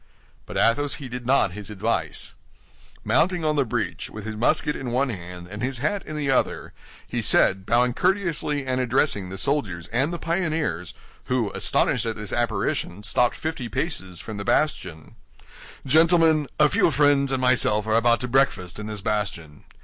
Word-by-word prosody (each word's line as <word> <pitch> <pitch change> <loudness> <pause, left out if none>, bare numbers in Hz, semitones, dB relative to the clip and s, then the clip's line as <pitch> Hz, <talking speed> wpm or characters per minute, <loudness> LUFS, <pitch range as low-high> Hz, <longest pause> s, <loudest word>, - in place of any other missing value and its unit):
But - - -5
Athos 145 +5 +2
heeded 125 -3 -7
not 130 -7 +3
his 105 +2 -8
advice. 100 -6 -2 0.7
Mounting 175 -2 +1
on 155 0 +1
the 140 - +3
breach, 110 -5 -3
with 110 -1 -9
his 110 0 -5
musket 150 +6 +1
in 130 - -5
one 130 +3 +1
hand 90 -4 -7
and 105 +3 -8
his 130 +1 -2
hat 175 +10 -1
in 155 - -5
the 140 -2 0
other, 130 - 0 0.3
he - - -2
said, 95 0 +3
bowing 120 +1 +3
courteously 170 -5 0
and 130 0 0
addressing 125 -6 +1
the 95 - -6
soldiers 100 - -1
and 130 +7 0
the 175 - -3
pioneers, 160 - -2 0.3
who, 125 -5 0
astonished 115 -1 +1
at 115 - -2
this 105 -2 -5
apparition, 105 -4 -1
stopped 120 +3 +2
fifty 155 -7 -4
paces 95 - -3
from 110 -2 -7
the 100 - -4
bastion: 100 - -1 0.7
"Gentlemen, 160 +1 +4
a 150 - +7
few 150 - +3
friends 145 -2 +3
and 135 - +1
myself 125 -4 +2
are 110 - 0
about 115 +1 +3
to 125 - -2
breakfast 120 -8 +1
in 105 - -6
this 105 -2 -5
bastion. 95 -8 -3
120 Hz, 170 wpm, -24 LUFS, 105-145 Hz, 0.7 s, a